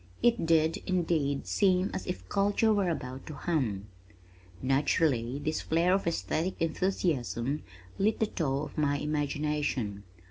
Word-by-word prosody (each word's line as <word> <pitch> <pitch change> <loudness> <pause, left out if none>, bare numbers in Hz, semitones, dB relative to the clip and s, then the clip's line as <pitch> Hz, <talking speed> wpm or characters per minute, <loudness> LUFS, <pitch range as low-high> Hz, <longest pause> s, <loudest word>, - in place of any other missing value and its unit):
It 235 -7 +3
did, 160 0 +3
indeed 160 -6 0
seem 190 -1 +2
as - - -4
if 180 - -5
culture 205 +2 +2
were 200 -3 +2
about 130 -5 -5
to 155 - -6
hum. 125 - -1 0.7
Naturally 135 -2 +1
this 155 +2 -2
flare 170 +3 +2
of 195 -2 +1
esthetic 165 - -1
enthusiasm 155 -6 0 0.4
lit 210 +3 +2
the 220 - +3
tow 145 -8 -1
of 155 - -6
my 145 -1 +2
imagination. 145 -7 -1
155 Hz, 135 wpm, -30 LUFS, 140-180 Hz, 0.7 s, It